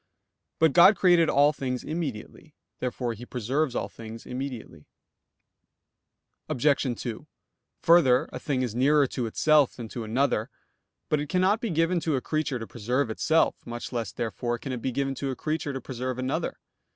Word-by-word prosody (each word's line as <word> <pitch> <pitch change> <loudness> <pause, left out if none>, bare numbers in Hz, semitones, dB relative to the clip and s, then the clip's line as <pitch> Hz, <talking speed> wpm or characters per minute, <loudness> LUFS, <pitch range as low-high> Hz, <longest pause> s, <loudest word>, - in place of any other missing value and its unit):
But 160 -3 +3
God 180 +4 +8
created 175 -3 +4
all 145 +2 +4
things 125 -3 -3
immediately. 150 -9 -6 0.2
Therefore 125 -1 -2
He 115 +2 -10
preserves 125 +3 -1
all - - -1
things 115 0 -10
immediately. 125 - -6 1.6
Obj. 130 - -3 0.3
2: 115 -3 -6 0.6
Further, 140 -7 +5
a - - -5
thing 130 -3 -1
is 120 -4 -3
nearer 140 +4 +4
to 125 -2 -3
itself 150 +4 +3
than 120 -2 -7
to 120 - -5
another. 110 0 0 0.6
But 150 - +1
it 145 0 -4
cannot 190 +5 +2
be 235 - -2
given 165 +1 +1
to 160 -3 0
a - - +1
creature 155 -3 -1
to 115 - -6
preserve 120 +3 -1
itself; 160 +8 +2
much 120 +2 -7
less 115 -2 -2
therefore 120 +1 -3
can 135 +3 -6
it 125 -2 -4
be 130 - -1
given 135 +2 -1
to 135 +1 -4
a 130 - -3
creature 155 0 -2
to 135 - -4
preserve 130 -1 -4
another. 130 +1 -2
130 Hz, 170 wpm, -27 LUFS, 120-155 Hz, 1.6 s, God